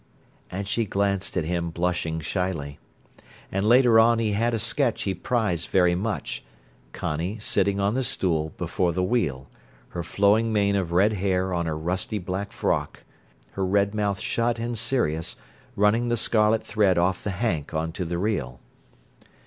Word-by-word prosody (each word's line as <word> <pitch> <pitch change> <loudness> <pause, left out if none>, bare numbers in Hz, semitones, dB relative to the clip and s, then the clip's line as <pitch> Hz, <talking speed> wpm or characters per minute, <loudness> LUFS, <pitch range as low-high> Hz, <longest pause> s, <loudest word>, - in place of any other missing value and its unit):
And 100 +2 -4
she 115 +3 0
glanced 100 -1 -1
at 90 - +1
him 85 +1 -2
blushing 85 -1 -1
shyly. 80 -4 -3 0.7
And 95 +1 -1
later 120 0 +6
on 115 +1 +5
he 110 -2 0
had 115 +4 +1
a - - 0
sketch 120 +2 0
he 95 - -1
prized 95 -4 -1
very 90 -2 +4
much: 105 +4 -3 0.5
Connie 85 +8 -3
sitting 100 -1 0
on 100 +1 +1
the 130 +2 0
stool 80 -9 0
before 90 -2 0
the 90 +2 0
wheel, 90 - 0 0.4
her 85 - -4
flowing 105 +6 +2
mane 100 -2 +2
of 95 -4 -1
red 100 +5 +3
hair 95 -1 0
on 85 -1 -1
her 80 -1 -2
rusty 90 +6 -2
black 100 +2 -4
frock, - - -2 0.5
her 95 - -3
red 100 +2 +2
mouth 100 -3 -1
shut 115 0 0
and 120 +1 -3
serious, 110 - 0 0.4
running 105 +4 +3
the 120 - +1
scarlet 110 0 +2
thread 100 -4 +2
off 90 +2 +1
the - - -2
hank 95 -7 -2
on 80 +1 -2
to 90 +3 -4
the 85 0 -3
reel. 85 - -2
100 Hz, 165 wpm, -25 LUFS, 85-110 Hz, 0.7 s, later